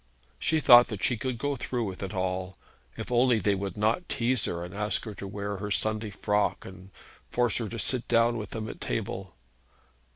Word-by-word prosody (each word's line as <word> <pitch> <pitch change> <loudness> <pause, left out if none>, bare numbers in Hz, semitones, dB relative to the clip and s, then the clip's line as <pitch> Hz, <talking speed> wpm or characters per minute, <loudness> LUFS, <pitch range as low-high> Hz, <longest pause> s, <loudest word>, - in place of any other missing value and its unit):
She 160 0 +2
thought 120 -4 +8
that 105 -5 -6
she 120 - +3
could 125 +2 -3
go 145 +4 -1
through 125 -1 -2
with 95 -4 -5
it 95 -1 -4
all, 95 -2 -2 0.4
if - - -6
only 120 0 +4
they 100 0 +2
would 100 +1 -4
not 110 - +1
tease 125 0 +1
her, 85 0 -3
and 90 - -10
ask 105 +1 -1
her 110 - -5
to 100 0 -7
wear 100 0 -4
her 105 +2 -4
Sunday 110 +1 0
frock, 105 0 0
and 95 0 -11 0.4
force 120 -3 +1
her 115 -3 -2
to 115 - -6
sit 125 +1 -1
down 115 +1 +3
with 105 -2 -6
them 110 -1 -5
at - - -8
table. 95 +6 -3
105 Hz, 205 wpm, -28 LUFS, 95-120 Hz, 0.4 s, thought